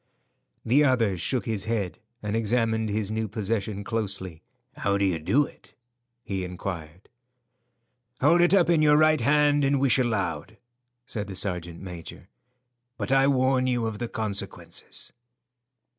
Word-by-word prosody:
The 135 Hz, +6 st, +4 dB
other 120 Hz, -8 st, +2 dB
shook 120 Hz, +8 st, -1 dB
his 110 Hz, -3 st, -2 dB
head 110 Hz, -4 st, -2 dB, 0.2 s
and 105 Hz, +1 st, -2 dB
examined 110 Hz, 0 st, +1 dB
his 105 Hz, 0 st, -1 dB
new 110 Hz, 0 st, -1 dB
possession 105 Hz, -1 st, -2 dB
closely. 100 Hz, -6 st, -4 dB, 0.4 s
"How 100 Hz, 0 st, +1 dB
do 100 Hz, -, +2 dB
you 90 Hz, -4 st, 0 dB
do 135 Hz, -, +2 dB
it?" -, -, -17 dB, 0.5 s
he 95 Hz, -4 st, -3 dB
inquired. 90 Hz, -1 st, -6 dB, 1.1 s
"Hold 165 Hz, +6 st, +5 dB
it 175 Hz, -, +4 dB
up 190 Hz, -3 st, +5 dB
in 170 Hz, -2 st, +3 dB
your 150 Hz, -1 st, +5 dB
right 155 Hz, 0 st, +4 dB
hand 145 Hz, 0 st, +3 dB
and 140 Hz, 0 st, +2 dB
wish 135 Hz, -1 st, +3 dB
aloud," 110 Hz, -5 st, -1 dB, 0.5 s
said 105 Hz, -5 st, -5 dB
the 95 Hz, -, -7 dB
sergeant 90 Hz, -3 st, -3 dB
major, 90 Hz, -4 st, -9 dB, 0.7 s
"but -, -, -3 dB
I 135 Hz, 0 st, +5 dB
warn 130 Hz, -1 st, +2 dB
you 120 Hz, -2 st, 0 dB
of 110 Hz, -2 st, -4 dB
the 120 Hz, -, -2 dB
consequences." 110 Hz, -3 st, -5 dB
110 Hz, 145 wpm, -26 LUFS, 100-130 Hz, 1.1 s, Hold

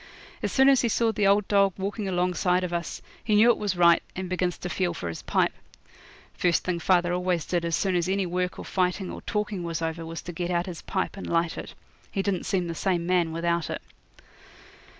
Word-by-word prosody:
As -, -, -1 dB
soon 265 Hz, 0 st, +5 dB
as 275 Hz, -2 st, +6 dB
he 240 Hz, -, +1 dB
saw 225 Hz, +1 st, +2 dB
the 210 Hz, -2 st, +1 dB
old 200 Hz, 0 st, +3 dB
dog 200 Hz, -2 st, +4 dB
walking 200 Hz, +2 st, -3 dB
alongside 180 Hz, 0 st, +1 dB
of 175 Hz, -1 st, -3 dB
us 170 Hz, -1 st, -4 dB, 0.2 s
he 215 Hz, -, +2 dB
knew 225 Hz, +3 st, +7 dB
it -, -, 0 dB
was 205 Hz, -3 st, -1 dB
right, 170 Hz, -1 st, +6 dB
and 185 Hz, 0 st, -4 dB
begins 180 Hz, -1 st, -1 dB
to -, -, -5 dB
feel 175 Hz, -1 st, -1 dB
for 85 Hz, -, -4 dB
his 80 Hz, -, -6 dB
pipe. -, -, +1 dB, 0.8 s
First 175 Hz, -2 st, +1 dB
thing 180 Hz, -2 st, -1 dB
father 175 Hz, 0 st, +2 dB
always 180 Hz, -2 st, 0 dB
did 175 Hz, -2 st, -1 dB
as 170 Hz, -1 st, 0 dB
soon 190 Hz, -2 st, 0 dB
as 175 Hz, +1 st, +1 dB
any 195 Hz, 0 st, +1 dB
work 180 Hz, +1 st, -2 dB
or -, -, -7 dB
fighting 185 Hz, 0 st, -1 dB
or -, -, -7 dB
talking 210 Hz, -3 st, -2 dB
was 165 Hz, -2 st, -3 dB
over 165 Hz, 0 st, -3 dB
was 165 Hz, 0 st, -6 dB
to 175 Hz, -, -6 dB
get 175 Hz, +1 st, -3 dB
out 175 Hz, -1 st, 0 dB
his 175 Hz, -4 st, -7 dB
pipe 190 Hz, +1 st, -2 dB
and -, -, -6 dB
light 165 Hz, 0 st, +1 dB
it. -, -, -8 dB, 0.4 s
He 195 Hz, -, -1 dB
didn't 195 Hz, -3 st, -1 dB
seem 185 Hz, -2 st, +1 dB
the 170 Hz, -, -3 dB
same 175 Hz, +1 st, 0 dB
man 175 Hz, -2 st, +2 dB
without 170 Hz, 0 st, -1 dB
it. -, -, -4 dB
180 Hz, 230 wpm, -26 LUFS, 170-195 Hz, 0.8 s, knew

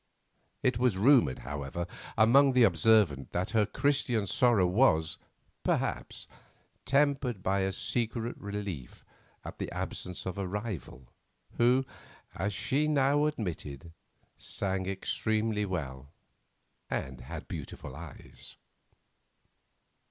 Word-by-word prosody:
It 125 Hz, -4 st, +2 dB
was 125 Hz, -6 st, +2 dB
rumoured, 120 Hz, -, +4 dB
however, 70 Hz, +5 st, -4 dB, 0.3 s
among 130 Hz, +5 st, +6 dB
the 125 Hz, -1 st, +6 dB
observant 105 Hz, -, +4 dB
that 90 Hz, +2 st, -1 dB
her 110 Hz, -3 st, +3 dB
Christian 125 Hz, -4 st, +1 dB
sorrow 105 Hz, +1 st, +3 dB
was, 90 Hz, -5 st, +3 dB, 0.4 s
perhaps, -, -, -1 dB, 0.6 s
tempered 135 Hz, -7 st, +1 dB
by 95 Hz, +1 st, +1 dB
a 95 Hz, 0 st, +1 dB
secret 115 Hz, +3 st, -1 dB
relief 100 Hz, -10 st, -6 dB, 0.4 s
at -, -, -8 dB
the -, -, -4 dB
absence 90 Hz, -1 st, -4 dB
of 95 Hz, +2 st, -4 dB
a 95 Hz, -, -2 dB
rival, 95 Hz, -, -5 dB, 0.5 s
who, 125 Hz, +3 st, +4 dB, 0.5 s
as 95 Hz, +4 st, -2 dB
she 125 Hz, +9 st, +1 dB
now 145 Hz, 0 st, +3 dB
admitted, 85 Hz, -, -5 dB, 0.5 s
sang 95 Hz, -1 st, -2 dB
extremely 105 Hz, +2 st, -1 dB
well 70 Hz, -7 st, -4 dB, 0.8 s
and 65 Hz, -2 st, -3 dB
had -, -, -8 dB
beautiful -, -, -7 dB
eyes. -, -, -11 dB
105 Hz, 105 wpm, -30 LUFS, 90-125 Hz, 0.8 s, among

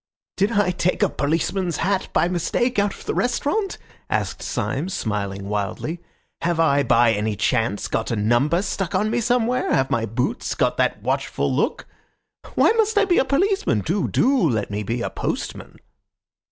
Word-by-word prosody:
"Did 200 Hz, +4 st, +1 dB
I 200 Hz, -3 st, +2 dB
take 180 Hz, +3 st, 0 dB
a 200 Hz, -, +3 dB
policeman's 165 Hz, +3 st, -1 dB
hat 190 Hz, +2 st, 0 dB
by -, -, +2 dB
mistake 190 Hz, +7 st, 0 dB
out 200 Hz, 0 st, +2 dB
of -, -, -13 dB
the -, -, -1 dB
restaurant?" 295 Hz, -, 0 dB, 0.3 s
asked -, -, -2 dB
Syme, 145 Hz, +7 st, -2 dB
smiling 100 Hz, -, -3 dB
wildly. 105 Hz, -, -3 dB, 0.4 s
"Have 170 Hz, -1 st, 0 dB
I 145 Hz, -3 st, +4 dB
by 120 Hz, -3 st, +4 dB
any 105 Hz, 0 st, -1 dB
chance 110 Hz, -1 st, 0 dB
got 110 Hz, -, -2 dB
a 115 Hz, -, 0 dB
number 120 Hz, -, +2 dB
stuck 195 Hz, -2 st, -3 dB
on 210 Hz, -, +2 dB
to 215 Hz, -, -1 dB
me 240 Hz, -, +1 dB
somewhere? 245 Hz, +1 st, +1 dB
Have 135 Hz, 0 st, +1 dB
my 115 Hz, -1 st, 0 dB
boots 125 Hz, -, -2 dB
got -, -, +1 dB
that -, -, 0 dB
watchful -, -, -1 dB
look? -, -, -1 dB, 0.7 s
Why -, -, +5 dB
must 440 Hz, -1 st, +1 dB
I 410 Hz, -, +5 dB
be 355 Hz, -2 st, +3 dB
a -, -, +2 dB
policeman? 300 Hz, -, +1 dB
Do, 180 Hz, -, 0 dB
do 270 Hz, +2 st, +2 dB
let 110 Hz, -4 st, -1 dB
me 105 Hz, +1 st, -2 dB
be 115 Hz, +3 st, -2 dB
a -, -, -3 dB
postman." -, -, -4 dB
170 Hz, 180 wpm, -22 LUFS, -, 0.7 s, Why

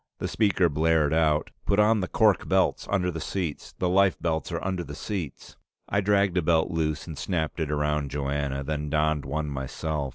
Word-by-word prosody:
The -, -, -3 dB
speaker 100 Hz, -4 st, +2 dB
blared, 80 Hz, 0 st, +2 dB, 0.5 s
"Put 100 Hz, -, +3 dB
on 105 Hz, 0 st, +4 dB
the 90 Hz, -, -2 dB
cork 105 Hz, -3 st, +2 dB
belts -, -, +2 dB
under 90 Hz, -3 st, +1 dB
the 80 Hz, -1 st, -5 dB
seats. 85 Hz, -7 st, -4 dB
The 90 Hz, -, 0 dB
life 95 Hz, +1 st, +3 dB
belts 80 Hz, -2 st, -2 dB
are -, -, -3 dB
under 95 Hz, -2 st, -1 dB
the 75 Hz, -3 st, -8 dB
seats." 85 Hz, -, -6 dB, 0.3 s
I 100 Hz, -, +2 dB
dragged 100 Hz, -2 st, +2 dB
a -, -, +4 dB
belt 80 Hz, +1 st, +2 dB
loose 80 Hz, -2 st, -1 dB
and 80 Hz, -, -7 dB
snapped 80 Hz, -1 st, -2 dB
it 80 Hz, -2 st, -1 dB
around 75 Hz, -1 st, 0 dB
Joanna, 70 Hz, 0 st, -2 dB
then 75 Hz, +1 st, -3 dB
donned 75 Hz, -1 st, +1 dB
one 75 Hz, +3 st, -2 dB
myself. 70 Hz, +2 st, -3 dB
80 Hz, 190 wpm, -26 LUFS, 75-95 Hz, 0.5 s, on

